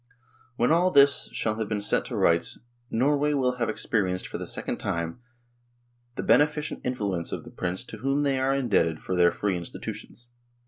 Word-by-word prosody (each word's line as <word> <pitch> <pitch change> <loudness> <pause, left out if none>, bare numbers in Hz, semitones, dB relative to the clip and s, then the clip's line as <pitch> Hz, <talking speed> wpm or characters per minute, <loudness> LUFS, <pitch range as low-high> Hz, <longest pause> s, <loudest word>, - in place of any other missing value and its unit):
When 120 +3 +2
all 175 +3 +4
this 140 -4 +5
shall 110 0 -1
have 110 - -2
been 105 -1 -1
set 100 - +2
to - - -5
rights - - +2 0.2
" 120 0 -41
Norway 145 +5 +2
will 125 -2 +1
have 115 - -1
experienced 95 -5 -1
for - - -6
the - - -6
second - - -3
time 85 +4 -3 1.0
the - - -3
beneficent 150 +1 +2
influence 100 -9 -2
of - - -4
the - - -12
prince 95 +4 -3
to 115 - -10
whom 135 +4 0
they 140 -2 +1
are 135 +1 +1
indebted 100 -11 +1
for 95 - -3
their 85 -1 +5
free 100 -2 -1
institutions." 90 +6 -8
120 Hz, 185 wpm, -26 LUFS, 95-140 Hz, 1.0 s, this